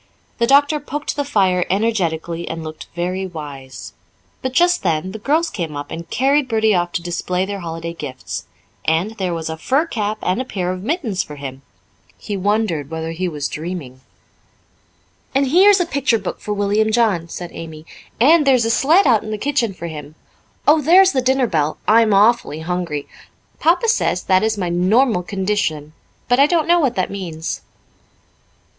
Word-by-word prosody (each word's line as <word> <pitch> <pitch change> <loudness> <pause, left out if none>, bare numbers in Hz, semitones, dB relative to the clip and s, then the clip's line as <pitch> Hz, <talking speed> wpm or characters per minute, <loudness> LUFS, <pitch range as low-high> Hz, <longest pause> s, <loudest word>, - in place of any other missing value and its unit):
The 235 - +2
doctor 285 +3 +4
poked 295 +1 -4
the 285 - -1
fire 190 -9 +2
energetically 170 -5 -1
and 165 0 -5
looked 155 0 -8
very 185 +2 -2
wise. 145 -6 -9 0.5
But 260 - -2
just 350 +5 +3
then 170 0 -1
the 220 - -7
girls 310 +9 +1
came 160 -6 -4
up 145 - -7
and 170 +1 -7
carried 275 +3 +2
Bertie 220 -2 +2
off 175 -1 0
to 170 - -2
display 180 +1 -2
their 200 0 -5
holiday 165 -1 -5
gifts. 130 - -7 0.4
And 165 +6 +1
there 180 -3 -1
was 160 -1 -4
a 160 0 -4
fur 275 - +1
cap 215 -8 -2
and 185 +7 0
a - - -2
pair 185 -7 -3
of 185 0 -5
mittens 230 - -1
for 150 - -8
him! 135 -2 -8 0.6
He 205 - -5
wondered 195 -7 0
whether 160 0 -4
he 180 +3 -2
was 150 -4 -3
dreaming. 155 -6 -6 1.3
"And 275 -1 +2
here's 385 +6 +6
a 355 - +1
picture 280 -7 +1
book - - -5
for 210 - -5
William 205 +1 +1
John," 210 -8 +1
said 175 0 -7
Amy, 160 -1 -9 0.3
"and 295 +4 +5
there 270 - +6
is 235 -2 +1
a 225 - +1
sled 320 +11 +4
out 230 -6 +4
in 215 - -7
the 215 - -3
kitchen 245 -2 0
for 180 -3 -9
him. 150 -2 -8 0.5
Oh, 305 +1 +6
there's 370 +6 +6
the 260 - +1
dinner 260 +1 +2
bell. 155 -7 0
I'm 225 0 +5
awfully 205 -5 +3
hungry. 170 -4 -3 0.5
Papa 350 +7 +3
says 435 - +1
that 185 -1 +3
is 220 0 0
my 180 -3 -2
'normal 190 +5 +2
condition,' 185 -6 -2 0.3
but 245 +1 +3
I 280 - +6
don't 330 -1 +1
know 345 0 +5
what 270 -7 +1
that 185 - -1
means." 170 -5 -5
195 Hz, 185 wpm, -19 LUFS, 165-255 Hz, 1.3 s, here's